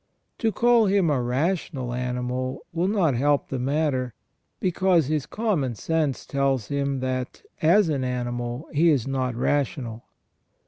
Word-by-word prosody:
To 225 -2 +1
call 235 -1 +4
him 190 -5 +3
a 135 -3 +1
rational 130 0 -1
animal 125 +1 -3
will 170 +2 +1
not 190 -8 +2
help 140 +4 +1
the 135 - -3
matter, 130 -3 0 0.4
because 180 -3 +2
his 150 0 -1
common 180 - -1
sense 155 +2 -1
tells 135 -5 0
him 140 -2 -1
that 130 -1 -3 0.2
as 175 +5 +5
an 140 -4 -1
animal 120 +1 -3
he 165 +3 +4
is 140 -7 +2
not 130 -2 -1
rational. 125 -3 -1
140 Hz, 140 wpm, -25 LUFS, 125-165 Hz, 0.4 s, as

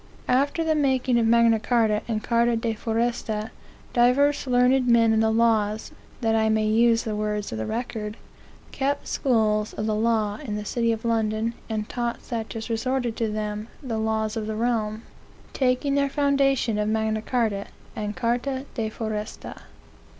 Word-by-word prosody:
"After 280 +6 +2
the 320 -1 +2
making 260 -4 +2
of 225 - +2
Magna 230 -1 +4
Charta, 220 -2 +2
and 220 -2 -2
Charta 235 0 +2
de 225 0 -1
Foresta, 225 -1 -2 0.4
divers 275 +4 +3
learned 250 +1 +3
men 230 -2 +5
in 220 - +3
the 220 0 +3
laws, 220 0 +1 0.3
that 225 -1 +2
I 220 0 +2
may 220 0 +2
use 230 +1 +3
the 215 -2 -3
words 210 -1 -2
of 110 - -4
the 110 - -3
record, 220 -2 -4 0.5
kept 280 +1 -1
schools 215 -4 +1
of 215 - -3
the 215 - 0
law 215 -1 +1
in 215 -7 -4
the 210 0 -4
city 230 +1 0
of 225 0 -3
London, 225 0 0 0.2
and 215 -1 -2
taught 240 -1 -3
such 230 -2 -5
as 220 -1 -5
resorted 240 0 -1
to 225 -2 -1
them 210 0 -3 0.2
the 230 -4 -2
laws 220 0 -1
of 220 -1 -3
the 220 - -3
realm, 220 -1 -1 0.5
taking 260 +2 +1
their 280 0 +2
foundation 275 -6 +1
of 210 0 0
Magna 220 0 0
Charta 220 -4 -1 0.3
and 210 0 -4
Charta 255 +3 -1
de 220 -2 -2
Foresta. 215 -1 -5
225 Hz, 170 wpm, -25 LUFS, 215-245 Hz, 0.5 s, men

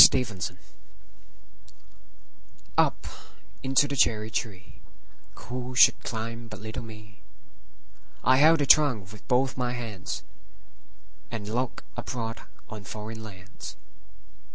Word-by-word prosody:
9. 130 -1 +2
Foreign 105 -5 -8
Lands 90 - -1 2.2
UP - - +2 0.6
into 135 +2 +4
the 140 - -3
cherry 110 -4 +2
treeWho 125 +5 -7
should - - +8
climb 115 +1 -4
but 110 -1 -8
little 110 0 -5
me?I 110 - -5
held 160 +4 +7
the - - +3
trunk 125 -10 +5
with 105 - -13
both 130 +2 +2
my 125 -1 -1
handsAnd 100 - -5 1.3
looked 125 +1 -1
abroad 115 -2 -4 0.3
on 105 -2 -8
foreign 110 +3 -7
lands. 100 -3 -9
115 Hz, 105 wpm, -27 LUFS, 105-125 Hz, 2.2 s, should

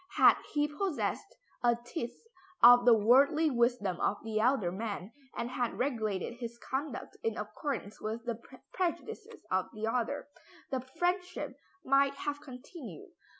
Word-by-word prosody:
Had - - +7
he 295 0 +2
possessed 305 +2 -2 0.3
a 240 -1 +5
tithe 240 +2 -5 0.5
of 245 0 +9
the 245 - +8
worldly 280 +8 +5
wisdom 235 -7 +1
of 205 - +1
the 220 -1 -1
elder 220 -6 +2
man, 200 0 -4 0.3
and 240 - -2
had 245 -2 -1
regulated 230 -4 -1
his 235 -1 -6
conduct 265 +1 -4
in 225 0 -1
accordance 210 0 -4
with 225 +2 -4
the 235 -1 -3 0.3
prejudices 360 -3 -3
of 185 0 +1
the 215 +1 -2
other, 245 +5 -1 0.4
the 260 - 0
friendship 355 +8 -2 0.3
might 275 +1 +4
have 290 0 -3
continued. 255 - -10
245 Hz, 140 wpm, -32 LUFS, 220-280 Hz, 0.5 s, of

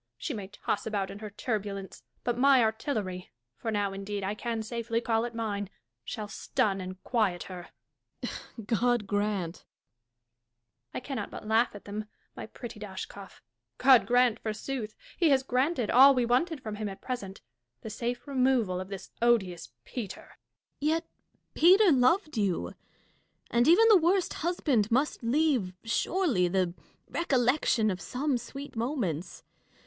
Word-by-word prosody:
She 300 - -4
may 205 -5 -5
toss 205 +1 -3
about 200 -3 -2
in 200 - -9
her 215 -1 -6
turbulence; 205 -2 -4 0.2
but 240 - 0
my 270 +1 +5
artilleiy 215 -5 -1 0.3
(for 225 - -5
now, 205 -2 0
indeed, 200 +1 -4
I 195 +2 -1
can 225 0 -3
safely 230 0 -2
call 230 -1 0
it 240 -1 -6
mine) 205 -3 -2 0.3
shall 215 - -5
stun 195 -1 -1
and 185 0 -7
quiet 215 -8 0
her. 180 -2 -8 0.6
Dashkof. 225 - -7
God 240 0 +1
grant 205 -4 -1
Catharine. - - -24 1.3
I - - -1
cannot 270 +1 -4
but - - -9
laugh 225 +1 +2
at 205 - -11
thee, 210 +1 -4 0.3
my - - -7
pretty 230 0 -9
Dashkof! 195 -1 -8 0.4
God 255 -7 +6
grant, 245 -1 +3
forsooth! 220 +1 -4 0.2
He 335 -3 +4
has 270 -2 +4
granted 255 -1 0
all 270 +3 +8
we 250 -1 +2
wanted 275 +5 +1
from 215 -1 -5
him 215 -1 -3
at 195 - -9
present 200 -7 -5 0.2
— 120 0 -54
the 220 - -6
safe 240 +4 -3
removal 255 -9 +2
of 185 - -7
this 195 -2 -8
odious 190 -8 +2 0.2
Peter. 220 -7 -6
Dashkof. - - -30
Yet 320 +3 +1 0.5
Peter 375 +4 +6
loved 305 - +3
you; 180 - 0 0.8
and 235 +1 +3
even 370 +8 +7
the 435 -3 +8
worst 355 +2 +2
husband 290 - 0
must 265 +5 +1
leave, 250 -6 +1
surely, 235 - +1
the 180 -1 0 0.3
recollection 250 -7 +2
of 185 - -5
some 265 0 -1
sweet 275 +4 -9
moments. 225 - -3
225 Hz, 155 wpm, -29 LUFS, 200-260 Hz, 1.3 s, all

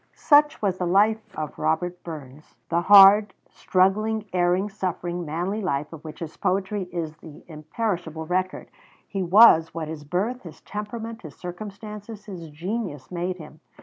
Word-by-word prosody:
"] - - -43
Such 295 -4 +4
was 190 -2 0
the 180 - -1
life 210 +5 +3 0.2
of 155 -1 -5
Robert 180 +2 -1
Burns, 150 -3 -10
the 170 +1 +1
hard, 200 +2 +8 0.2
struggling, 210 +4 +1
erring, 180 +2 +2
suffering, 180 -3 -4
manly 180 +8 -2
life, 150 -5 -2
of 155 - -10
which 155 0 -10
his 165 -1 -7
poetry 195 +1 -1
is 165 -3 -4
the 160 -2 -13
imperishable 160 0 -4
record. 185 +2 -2 0.4
He 195 - -3
was 175 -4 +6
what 160 -2 -4
his 155 -2 -7
birth, 200 - -2
his 165 -4 -12
temperament, 225 +2 -6
his 155 -5 -11
circumstances, 210 +3 -8
his 175 -6 -8
genius 170 - -5
made 180 +1 -3
him. 155 -2 -12
180 Hz, 155 wpm, -24 LUFS, 160-210 Hz, 0.4 s, hard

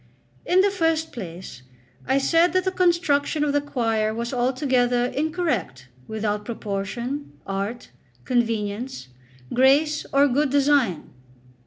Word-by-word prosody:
In 365 +1 +5
the 400 +1 +2
first 325 -4 0
place, 175 - -8 0.5
I 265 - +3
said 330 +6 +3
that 370 0 +2
the 375 - 0
construction 335 -5 +1
of 290 -1 0
the 290 - +2
choir 225 -6 -1
was 235 +2 -4
altogether 250 -1 +1
incorrect, 255 - -2 0.2
without 210 -1 -2
proportion, 235 +6 -4
art, 200 +5 -4 0.3
convenience, 225 - -2 0.4
grace, 285 +4 +3
or 280 +1 +5
good 285 +2 +1
design. 275 - +2
255 Hz, 120 wpm, -23 LUFS, 220-300 Hz, 0.5 s, In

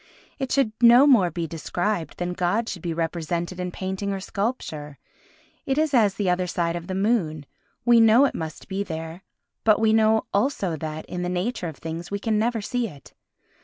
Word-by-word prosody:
It 265 -1 -3
should 275 -6 +2
no 240 +3 +8
more 235 -11 +5
be 170 0 -3
described 170 +3 -3
than 175 0 -2
God 185 +6 0
should 180 - -5
be 170 - -3
represented 170 +2 -3
in 180 0 -2
painting 190 +2 -3
or 195 - -2
sculpture. 185 - -4 0.7
It 270 0 0
is 310 -1 +1
as 215 -6 +4
the 205 - -1
other 180 0 +1
side 170 -1 -1
of 170 0 -6
the 185 - -3
moon; 190 -8 0 0.4
we 240 -1 +6
know 225 +4 +6
it - - 0
must 160 -1 -6
be 195 0 -3
there 165 -1 -6 0.4
but 215 -1 +4
we 220 0 +3
know 220 0 +3
also 200 - 0
that, 155 0 -5
in 180 - -5
the 180 - -2
nature 180 +1 -2
of 160 - -7
things, 165 +2 -6
we 200 - -2
can 215 +1 0
never 230 0 0
see 245 +3 -1
it. 145 -8 -14
190 Hz, 200 wpm, -24 LUFS, 170-220 Hz, 0.7 s, no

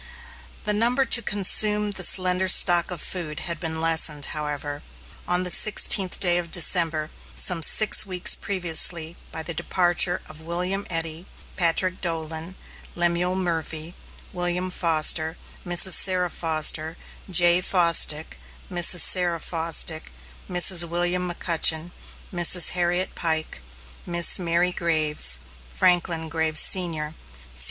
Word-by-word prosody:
The 210 - -1
number 240 +5 0
to 235 - +2
consume 210 0 +3
the 190 -1 -3
slender 185 +1 +2
stock 175 -2 +4
of 175 -4 -5
food 160 -5 -6
had 170 -2 -4
been 160 -1 -6
lessened, 160 -2 +1
however, 145 -1 -7 0.5
on 180 +1 -1
the 180 - -4
sixteenth 195 -2 +3
of 175 -1 +1
December, 165 -2 +2 0.2
some 175 -2 +3
six 215 +6 +3
weeks 185 -2 +1
previously, 170 -3 0 0.2
by 160 - -9
the 170 - -4
departure 175 +1 0
of 155 0 -9
William 180 +4 -5
Eddy, 165 +1 -6 0.3
Patrick 180 +2 -2
Dolan, 165 0 -5 0.4
Lemuel 175 +1 -2
Murphy, 165 -2 -5 0.4
William 180 +1 -4
Foster, 160 -1 0 0.3
Mrs. 175 +1 +4
Sarah 180 -2 +2
Foster, 160 0 -2 0.3
Jay 175 0 +3
Fosdick, 170 - 0 0.3
Mrs. 175 0 +3
Sarah 175 -2 +4
Fosdick, 160 -1 -1 0.4
Mrs. 180 -1 +4
William 175 +1 -4
McCutchen, 165 -1 -1 0.4
Mrs. 175 0 +3
Harriet 180 +1 -3
Pike, 160 - -5 0.5
Miss 175 +1 +2
Mary 175 +1 -2
Graves, 155 - -1 0.3
Franklin 175 - -2
Graves, 160 -1 -1
Sr. 160 -5 +1
175 Hz, 115 wpm, -21 LUFS, 160-180 Hz, 0.5 s, stock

